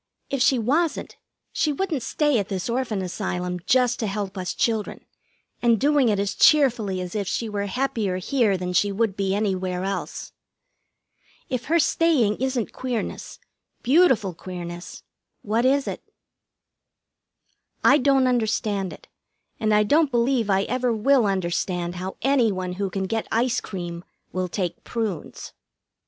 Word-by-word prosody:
If 275 Hz, -2 st, -1 dB
she 260 Hz, 0 st, +4 dB
wasn't, 290 Hz, +9 st, 0 dB, 0.4 s
she 305 Hz, -, +1 dB
wouldn't 315 Hz, -2 st, -2 dB
stay 290 Hz, +2 st, +1 dB
at 200 Hz, -, -2 dB
this 190 Hz, +3 st, -3 dB
Orphan 235 Hz, -6 st, -1 dB
Asylum, 180 Hz, -1 st, -3 dB
just 250 Hz, -2 st, +3 dB
to 220 Hz, -, -1 dB
help 195 Hz, -1 st, -4 dB
us 185 Hz, -1 st, -4 dB
children, 220 Hz, -3 st, -1 dB, 0.6 s
and 235 Hz, -2 st, +3 dB
doing 285 Hz, -2 st, +3 dB
it 210 Hz, -, +2 dB
as 200 Hz, 0 st, -1 dB
cheerfully 240 Hz, -11 st, +4 dB
as 180 Hz, -1 st, -6 dB
if 205 Hz, -3 st, -2 dB
she 230 Hz, -, -2 dB
were 205 Hz, -1 st, -3 dB
happier 220 Hz, -4 st, -1 dB
here 210 Hz, 0 st, +1 dB
than 180 Hz, 0 st, -4 dB
she 205 Hz, +2 st, +2 dB
would 205 Hz, -1 st, 0 dB
be 195 Hz, -1 st, 0 dB
anywhere 185 Hz, -3 st, -1 dB
else. 195 Hz, +1 st, -4 dB, 1.2 s
If 250 Hz, -3 st, -2 dB
her 330 Hz, +3 st, +2 dB
staying 295 Hz, -10 st, +2 dB
isn't 255 Hz, -3 st, -2 dB
queerness, 250 Hz, -4 st, -4 dB, 0.5 s
beautiful 255 Hz, -, +4 dB
queerness, 175 Hz, 0 st, -8 dB, 0.4 s
what 225 Hz, +4 st, +1 dB
is 275 Hz, +2 st, +2 dB
it? -, -, -4 dB, 1.8 s
I 280 Hz, -, +6 dB
don't 270 Hz, -1 st, +3 dB
understand 220 Hz, -6 st, 0 dB
it, -, -, -13 dB, 0.5 s
and 215 Hz, -1 st, +1 dB
I 210 Hz, 0 st, +5 dB
don't 295 Hz, +7 st, +3 dB
believe 240 Hz, -2 st, +1 dB
I 195 Hz, 0 st, +3 dB
ever 250 Hz, +2 st, 0 dB
will 230 Hz, +1 st, +3 dB
understand 180 Hz, -1 st, -1 dB
how 185 Hz, +2 st, -5 dB
any 260 Hz, -4 st, +3 dB
one 185 Hz, -1 st, -3 dB
who 195 Hz, +1 st, -2 dB
can 190 Hz, +1 st, -3 dB
get 225 Hz, +3 st, -2 dB
ice 240 Hz, +2 st, +1 dB
cream 175 Hz, -3 st, -6 dB, 0.3 s
will 185 Hz, 0 st, -1 dB
take 180 Hz, -1 st, -3 dB
prunes. 215 Hz, -9 st, -4 dB
215 Hz, 150 wpm, -24 LUFS, 190-255 Hz, 1.8 s, I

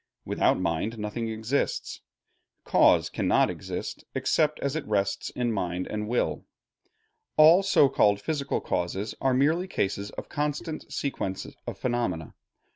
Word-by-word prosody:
Without -, -, +2 dB
mind 90 Hz, +6 st, -1 dB
nothing 110 Hz, +2 st, -3 dB
exists. 115 Hz, -, -2 dB, 0.6 s
Cause -, -, +4 dB
cannot -, -, +2 dB
exist -, -, -6 dB
except 155 Hz, -1 st, +1 dB
as 140 Hz, +1 st, -2 dB
it 160 Hz, -, -2 dB
rests 100 Hz, -2 st, 0 dB
in 120 Hz, -1 st, -1 dB
mind 90 Hz, -2 st, -2 dB
and 105 Hz, 0 st, -4 dB
will. 120 Hz, +2 st, 0 dB, 0.9 s
All 160 Hz, +4 st, +8 dB
so 195 Hz, -7 st, +5 dB
called 105 Hz, -7 st, +3 dB
physical 140 Hz, +5 st, -2 dB
causes 95 Hz, +4 st, -2 dB
are 130 Hz, -1 st, +2 dB
merely 160 Hz, +7 st, +2 dB
cases 100 Hz, -, -2 dB
of -, -, -8 dB
constant 150 Hz, +2 st, -3 dB
sequence 95 Hz, -9 st, -3 dB, 0.2 s
of -, -, -5 dB
phenomena. 120 Hz, -11 st, -2 dB
115 Hz, 130 wpm, -27 LUFS, 100-145 Hz, 0.9 s, All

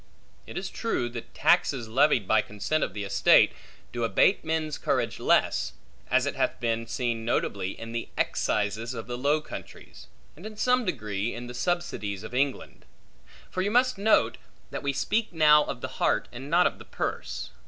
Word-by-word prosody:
It -, -, -7 dB
is -, -, -4 dB
true 175 Hz, -, -1 dB
that 120 Hz, -1 st, -9 dB
taxes 125 Hz, -5 st, +2 dB
levied 125 Hz, -3 st, +3 dB
by 110 Hz, -1 st, +4 dB
consent 105 Hz, +10 st, -2 dB
of 95 Hz, -, -3 dB
the 105 Hz, -, -3 dB
estate, 100 Hz, -, +5 dB, 0.4 s
do 120 Hz, -1 st, -2 dB
abate 115 Hz, -, +3 dB
men's 160 Hz, -2 st, -2 dB
courage -, -, -1 dB
less: 60 Hz, -, +2 dB, 0.4 s
as -, -, +3 dB
it -, -, -2 dB
hath -, -, 0 dB
been 115 Hz, -1 st, -1 dB
seen 115 Hz, -1 st, -2 dB
notably, 100 Hz, -4 st, -1 dB
in 115 Hz, 0 st, -7 dB
the 115 Hz, 0 st, -4 dB
excises 110 Hz, +4 st, -1 dB
of 115 Hz, -, -5 dB
the 120 Hz, -, -5 dB
Low 145 Hz, +5 st, +1 dB
Countries; -, -, -10 dB, 0.3 s
and, 165 Hz, -, -14 dB
in 215 Hz, 0 st, -8 dB
some 250 Hz, +2 st, +2 dB
degree, 110 Hz, -, -2 dB
in 120 Hz, +1 st, -6 dB
the 120 Hz, -, -8 dB
subsidies 120 Hz, -, -2 dB
of 110 Hz, -, -8 dB
England. 135 Hz, +1 st, -2 dB, 0.7 s
For 185 Hz, -, -1 dB
you 195 Hz, -, 0 dB
must 245 Hz, 0 st, +2 dB
note, 215 Hz, +2 st, +3 dB, 0.3 s
that -, -, -4 dB
we 140 Hz, -, 0 dB
speak 215 Hz, +9 st, -1 dB
now 150 Hz, -2 st, +6 dB
of -, -, -5 dB
the -, -, -3 dB
heart, -, -, +2 dB
and 130 Hz, +3 st, -8 dB
not 175 Hz, +2 st, +4 dB
of -, -, 0 dB
the -, -, -11 dB
purse. 60 Hz, 0 st, -4 dB
125 Hz, 185 wpm, -27 LUFS, 115-160 Hz, 0.7 s, now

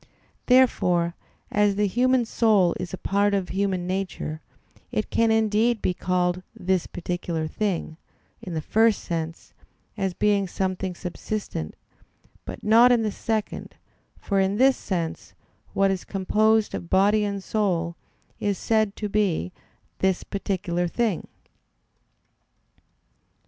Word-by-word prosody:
Therefore, 180 Hz, -10 st, +3 dB, 0.4 s
as 205 Hz, -1 st, +3 dB
the 210 Hz, +1 st, +2 dB
human 250 Hz, +4 st, +2 dB
soul 210 Hz, -6 st, +3 dB
is 180 Hz, -1 st, -5 dB
a 190 Hz, -, -5 dB
part 200 Hz, +2 st, +1 dB
of 190 Hz, -2 st, -2 dB
human 190 Hz, -2 st, -1 dB
nature, 185 Hz, -4 st, -3 dB, 0.5 s
it 215 Hz, -, -2 dB
can 230 Hz, 0 st, +3 dB
indeed 220 Hz, +1 st, +2 dB
be 180 Hz, -, 0 dB
called 180 Hz, 0 st, 0 dB
"this 185 Hz, -1 st, 0 dB
particular 175 Hz, -2 st, -3 dB
thing," 170 Hz, -2 st, -2 dB, 0.4 s
in 180 Hz, -3 st, -6 dB
the 155 Hz, -, -2 dB
first 225 Hz, -1 st, +3 dB
sense, 165 Hz, -1 st, -5 dB, 0.4 s
as 190 Hz, -2 st, -2 dB
being 200 Hz, -2 st, +2 dB
something 185 Hz, 0 st, -2 dB
subsistent; 180 Hz, -, -5 dB, 0.7 s
but -, -, -8 dB
not 230 Hz, +3 st, +6 dB
in 235 Hz, -2 st, +3 dB
the 215 Hz, -, 0 dB
second, 220 Hz, +1 st, -3 dB, 0.4 s
for 200 Hz, -2 st, -1 dB
in 195 Hz, +1 st, +2 dB
this 265 Hz, +2 st, +5 dB
sense, 170 Hz, -5 st, -4 dB, 0.4 s
what 195 Hz, 0 st, +3 dB
is 190 Hz, -1 st, -3 dB
composed 215 Hz, +3 st, +2 dB
of 170 Hz, -, -5 dB
body 205 Hz, +3 st, +4 dB
and 200 Hz, -1 st, -3 dB
soul 175 Hz, -6 st, 0 dB, 0.4 s
is 205 Hz, -2 st, 0 dB
said 215 Hz, -2 st, +1 dB
to 210 Hz, -, -3 dB
be 195 Hz, -, 0 dB, 0.5 s
"this 190 Hz, -1 st, +1 dB
particular 180 Hz, -3 st, -2 dB
thing." 215 Hz, 0 st, -1 dB
195 Hz, 130 wpm, -25 LUFS, 180-215 Hz, 0.7 s, not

